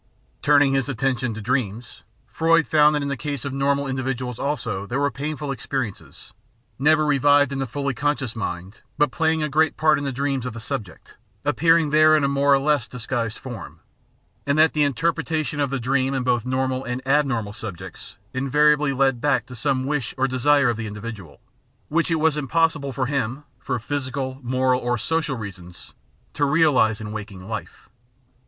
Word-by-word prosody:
Turning 145 Hz, -1 st, +4 dB
his 135 Hz, 0 st, 0 dB
attention 130 Hz, -1 st, -1 dB
to 110 Hz, -, -6 dB
dreams, 115 Hz, -2 st, -2 dB, 0.2 s
Freud 165 Hz, 0 st, +2 dB
found 150 Hz, -1 st, +4 dB
that 145 Hz, -, -1 dB
in -, -, -2 dB
the 140 Hz, -, -1 dB
case 145 Hz, 0 st, -4 dB
of 140 Hz, -, -3 dB
normal 140 Hz, +1 st, +1 dB
individuals 130 Hz, -2 st, -3 dB
also 115 Hz, -9 st, -2 dB
there 125 Hz, +5 st, -2 dB
were 140 Hz, 0 st, +1 dB
painful 150 Hz, 0 st, -4 dB
experiences, 125 Hz, -3 st, -5 dB, 0.5 s
never 155 Hz, +2 st, +4 dB
revived 145 Hz, -1 st, +4 dB
in 135 Hz, -, -3 dB
the 135 Hz, -, -2 dB
fully 140 Hz, +3 st, -2 dB
conscious 135 Hz, -2 st, -1 dB
mind, 95 Hz, -2 st, -5 dB, 0.2 s
but 150 Hz, -3 st, +3 dB
playing 160 Hz, 0 st, +1 dB
a -, -, +1 dB
great 155 Hz, +2 st, +1 dB
part 155 Hz, -2 st, +3 dB
in -, -, -5 dB
the 140 Hz, -, -2 dB
dreams 135 Hz, 0 st, -1 dB
of 125 Hz, -2 st, -4 dB
the 115 Hz, -, -7 dB
subject, 110 Hz, -5 st, -6 dB, 0.3 s
appearing 165 Hz, -2 st, +3 dB
there 155 Hz, 0 st, +6 dB
in 150 Hz, -, 0 dB
a -, -, +3 dB
more 140 Hz, +1 st, +2 dB
or 140 Hz, -, +7 dB
less 140 Hz, -3 st, +1 dB
disguised 115 Hz, -2 st, -3 dB
form; 125 Hz, -3 st, -9 dB, 0.7 s
and 140 Hz, +1 st, +2 dB
that 160 Hz, +1 st, +5 dB
the 150 Hz, -, +1 dB
interpretation 155 Hz, +1 st, -1 dB
of 140 Hz, -2 st, +1 dB
the 135 Hz, 0 st, -2 dB
dream 130 Hz, +2 st, 0 dB
in 130 Hz, -, -1 dB
both 125 Hz, -1 st, 0 dB
normal 130 Hz, 0 st, -1 dB
and 125 Hz, +1 st, -5 dB
abnormal 135 Hz, -7 st, +1 dB
subjects 95 Hz, -5 st, -8 dB, 0.2 s
invariably 145 Hz, +2 st, +3 dB
led 135 Hz, -2 st, +1 dB
back 135 Hz, -3 st, +1 dB
to 125 Hz, -, -10 dB
some 130 Hz, 0 st, 0 dB
wish 140 Hz, -4 st, -2 dB
or 135 Hz, +1 st, +2 dB
desire 135 Hz, +2 st, +3 dB
of 120 Hz, -2 st, 0 dB
the 110 Hz, 0 st, -4 dB
individual, 105 Hz, -7 st, -8 dB, 0.5 s
which 165 Hz, +3 st, +1 dB
it 165 Hz, -, +2 dB
was 160 Hz, -1 st, +2 dB
impossible 150 Hz, -1 st, +1 dB
for 130 Hz, 0 st, -1 dB
him, 135 Hz, 0 st, -2 dB, 0.2 s
for 125 Hz, 0 st, -2 dB
physical, 130 Hz, +1 st, -4 dB
moral, 130 Hz, 0 st, +1 dB
or 120 Hz, 0 st, 0 dB
social 155 Hz, +1 st, -1 dB
reasons, 95 Hz, -5 st, -9 dB, 0.4 s
to 145 Hz, -, -1 dB
realise 140 Hz, -7 st, +3 dB
in 105 Hz, -1 st, -6 dB
waking 100 Hz, -3 st, -8 dB
life. 110 Hz, -2 st, -7 dB
135 Hz, 185 wpm, -23 LUFS, 120-145 Hz, 0.7 s, or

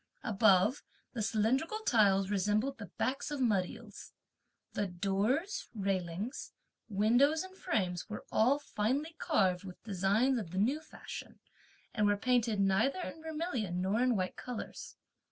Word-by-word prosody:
Above, 210 Hz, +3 st, +4 dB, 0.3 s
the 235 Hz, -, -3 dB
cylindrical 230 Hz, -, +1 dB
tiles 195 Hz, -4 st, +4 dB
resembled 210 Hz, +7 st, 0 dB
the 205 Hz, -, -7 dB
backs 270 Hz, +4 st, -1 dB
of 295 Hz, -2 st, -3 dB
mud 205 Hz, -8 st, +2 dB
eels. -, -, -11 dB, 0.6 s
The 205 Hz, -, -1 dB
doors, 205 Hz, -, -1 dB
railings, 195 Hz, -, -3 dB, 0.4 s
windows, 245 Hz, -, +3 dB
and 375 Hz, 0 st, -11 dB
frames 185 Hz, -, -2 dB
were 210 Hz, -, -6 dB
all 250 Hz, +6 st, +4 dB
finely 285 Hz, +4 st, -1 dB
carved 185 Hz, -, +2 dB
with 185 Hz, -2 st, -10 dB
designs 215 Hz, +6 st, +2 dB
of 195 Hz, -7 st, -6 dB
the 185 Hz, -, -6 dB
new 250 Hz, +10 st, +2 dB
fashion, 315 Hz, -, -9 dB, 0.5 s
and 210 Hz, -2 st, +2 dB
were 205 Hz, 0 st, +3 dB
painted 235 Hz, -2 st, +1 dB
neither 195 Hz, -, +2 dB
in 320 Hz, -, -6 dB
vermilion 305 Hz, -, -3 dB
nor 195 Hz, +5 st, +1 dB
in 250 Hz, -1 st, +3 dB
white 185 Hz, -2 st, -1 dB
colours. 250 Hz, -3 st, -7 dB
215 Hz, 140 wpm, -33 LUFS, 195-270 Hz, 0.6 s, Above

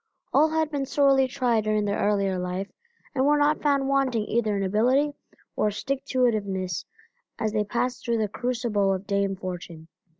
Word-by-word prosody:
All 305 Hz, +3 st, +5 dB
had 315 Hz, -1 st, 0 dB
been 280 Hz, -2 st, -2 dB
sorely 275 Hz, -2 st, +4 dB
tried 245 Hz, -4 st, 0 dB
during 215 Hz, -1 st, +1 dB
their 200 Hz, 0 st, -1 dB
earlier 200 Hz, -2 st, +1 dB
life 180 Hz, +2 st, -4 dB, 0.4 s
and 260 Hz, -2 st, +1 dB
were 295 Hz, +2 st, +4 dB
not 295 Hz, +1 st, +2 dB
found 280 Hz, -2 st, +2 dB
wanting 265 Hz, -5 st, +1 dB
either 215 Hz, -3 st, 0 dB
in 195 Hz, -, -1 dB
ability 250 Hz, +9 st, +2 dB, 0.4 s
or 210 Hz, -, +2 dB
stick 265 Hz, +6 st, -3 dB
to 255 Hz, -1 st, +2 dB
it 240 Hz, -, +3 dB
iveness 190 Hz, -4 st, -3 dB, 0.5 s
as 220 Hz, -2 st, -1 dB
they 210 Hz, -1 st, +1 dB
passed 245 Hz, +4 st, -2 dB
through 235 Hz, -1 st, 0 dB
the 215 Hz, -1 st, 0 dB
crucible 220 Hz, -4 st, 0 dB
of 190 Hz, +2 st, -7 dB
Dame 200 Hz, -1 st, 0 dB
Fortune. 175 Hz, -3 st, -7 dB
220 Hz, 185 wpm, -26 LUFS, 200-270 Hz, 0.5 s, All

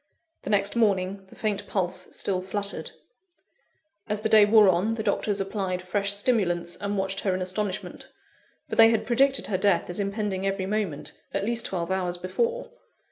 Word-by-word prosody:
The -, -, -7 dB
next 205 Hz, 0 st, +1 dB
morning, 195 Hz, -3 st, 0 dB
the -, -, -16 dB
faint 210 Hz, -2 st, -2 dB
pulse 180 Hz, -3 st, -2 dB
still 185 Hz, -2 st, -2 dB
fluttered. 200 Hz, +2 st, -4 dB, 1.2 s
As 210 Hz, 0 st, -1 dB
the 220 Hz, -, 0 dB
day 215 Hz, -1 st, +7 dB
wore 210 Hz, 0 st, +6 dB
on, 190 Hz, +5 st, +2 dB
the 220 Hz, -, -4 dB
doctors 205 Hz, -1 st, 0 dB
applied 190 Hz, -2 st, -2 dB
fresh 200 Hz, +2 st, -1 dB
stimulants, 200 Hz, -6 st, +1 dB
and 205 Hz, 0 st, -3 dB
watched 195 Hz, 0 st, -1 dB
her 190 Hz, -2 st, 0 dB
in 185 Hz, -, -3 dB
astonishment; 190 Hz, 0 st, -2 dB, 0.6 s
for -, -, -4 dB
they 225 Hz, 0 st, +8 dB
had 220 Hz, -1 st, +1 dB
predicted 265 Hz, +2 st, +2 dB
her 190 Hz, -3 st, -1 dB
death 190 Hz, -3 st, +2 dB
as 175 Hz, -, -4 dB
impending 200 Hz, -1 st, -2 dB
every 195 Hz, -1 st, -1 dB
moment, 195 Hz, -7 st, -3 dB, 0.2 s
at 195 Hz, 0 st, 0 dB
least 235 Hz, +1 st, -1 dB
twelve 175 Hz, -1 st, -3 dB
hours 180 Hz, -2 st, -1 dB
before. 470 Hz, -, -2 dB
200 Hz, 175 wpm, -26 LUFS, 185-215 Hz, 1.2 s, they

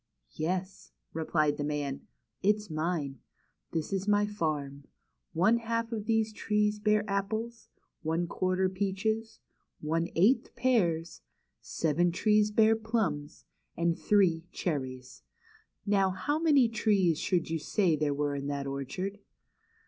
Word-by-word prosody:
"Yes," 185 Hz, +4 st, -3 dB, 0.2 s
replied 155 Hz, -2 st, +1 dB
the 145 Hz, -, -2 dB
man; 145 Hz, -2 st, -3 dB, 0.3 s
"it's 210 Hz, -1 st, +1 dB
mine. 155 Hz, -4 st, -2 dB, 0.5 s
This 165 Hz, +3 st, -3 dB
is 195 Hz, +1 st, -2 dB
my 205 Hz, 0 st, +4 dB
farm. 150 Hz, -8 st, -3 dB, 0.5 s
One 195 Hz, +8 st, +4 dB
half 230 Hz, 0 st, -2 dB
of 215 Hz, -2 st, -4 dB
these 220 Hz, -1 st, +1 dB
trees 210 Hz, 0 st, 0 dB
bear 210 Hz, 0 st, +2 dB
apples, 220 Hz, +4 st, -3 dB, 0.3 s
one 165 Hz, +2 st, 0 dB
quarter 185 Hz, +2 st, 0 dB
peaches, 205 Hz, +4 st, -2 dB, 0.4 s
one 165 Hz, +2 st, 0 dB
eighth 205 Hz, +11 st, +3 dB
pears, 170 Hz, -10 st, +1 dB, 0.4 s
seven 165 Hz, +2 st, +1 dB
trees 210 Hz, +3 st, +3 dB
bear 220 Hz, +1 st, +4 dB
plums, 220 Hz, -10 st, -2 dB, 0.3 s
and 170 Hz, 0 st, +1 dB
three, 180 Hz, -5 st, +2 dB
cherries. 130 Hz, -, -4 dB, 0.6 s
Now 195 Hz, -2 st, +3 dB
how 290 Hz, +11 st, -1 dB
many 290 Hz, -7 st, +5 dB
trees 205 Hz, -7 st, +2 dB
should 170 Hz, -3 st, 0 dB
you 165 Hz, -, 0 dB
say 175 Hz, +1 st, +1 dB
there 150 Hz, -1 st, 0 dB
were 145 Hz, 0 st, -1 dB
in 140 Hz, 0 st, -4 dB
that 140 Hz, -1 st, -2 dB
orchard?" 140 Hz, +9 st, -4 dB
185 Hz, 125 wpm, -30 LUFS, 155-210 Hz, 0.6 s, many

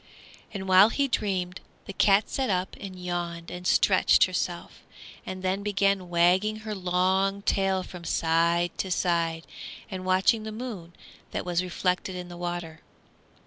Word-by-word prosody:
And 190 Hz, -2 st, -6 dB
while 190 Hz, +3 st, +7 dB
he 280 Hz, +4 st, 0 dB
dreamed, 185 Hz, -7 st, -2 dB, 0.2 s
the 195 Hz, -, -7 dB
cat 200 Hz, +1 st, +4 dB
sat 265 Hz, -2 st, -2 dB
up 185 Hz, 0 st, -1 dB
and 190 Hz, -2 st, -8 dB
yawned 175 Hz, -2 st, -4 dB
and 180 Hz, 0 st, -5 dB
stretched -, -, +4 dB
herself, -, -, -3 dB, 0.5 s
and 185 Hz, 0 st, -6 dB
then 190 Hz, +2 st, 0 dB
began 195 Hz, -2 st, 0 dB
wagging 180 Hz, +5 st, +3 dB
her 215 Hz, -, -3 dB
long 190 Hz, +1 st, 0 dB
tail 195 Hz, -2 st, +1 dB
from 180 Hz, -2 st, -10 dB
side 170 Hz, +1 st, +1 dB
to 190 Hz, -, -2 dB
side 170 Hz, -2 st, 0 dB, 0.5 s
and 185 Hz, -1 st, -5 dB
watching 185 Hz, +4 st, +3 dB
the 220 Hz, 0 st, -6 dB
moon 215 Hz, -7 st, -7 dB, 0.4 s
that -, -, -4 dB
was 175 Hz, -1 st, 0 dB
reflected 180 Hz, +1 st, -2 dB
in 180 Hz, -1 st, -7 dB
the 175 Hz, -, -9 dB
water. 175 Hz, -2 st, -5 dB
185 Hz, 150 wpm, -27 LUFS, 175-195 Hz, 0.5 s, while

